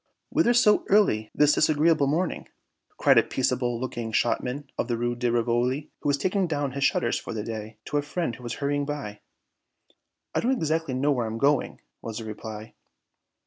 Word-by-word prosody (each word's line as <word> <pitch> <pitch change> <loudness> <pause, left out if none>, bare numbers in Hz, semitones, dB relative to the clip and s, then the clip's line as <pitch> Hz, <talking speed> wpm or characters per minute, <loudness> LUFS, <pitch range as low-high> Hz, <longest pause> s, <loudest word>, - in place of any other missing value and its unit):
"Whither 240 -7 +3
so 215 -3 +5
early 150 - +3
this 150 0 +5
disagreeable 155 -1 +3
morning?" 165 +6 -1 0.5
cried - - +5
a - - +6
peaceable 125 -2 -1
looking 120 -3 -4
shopman 125 +5 -1
of - - -2
the 120 -2 -1
Rue 120 +1 -1
de 120 0 0
Rivoli, 120 +5 0
who - - -1
was 140 - +2
taking 185 +5 0
down 145 -4 -1
his 140 +2 -3
shutters 120 -3 +1
for - - -7
the 105 - -3
day, 110 -1 -6
to 150 - -1
a - - +2
friend 145 -3 -3
who 125 - -14
was 120 -1 -5
hurrying 145 0 -1
by. 140 -8 -5 1.1
"I - - +1
don't 255 +3 +1
exactly 160 - -1
know 140 +3 +2
where 125 -5 0
I - - -3
am 110 - -4
going," 140 +3 +1 0.2
was 115 -2 -6
the 115 - -6
reply. 110 0 -8
135 Hz, 190 wpm, -26 LUFS, 115-150 Hz, 1.1 s, a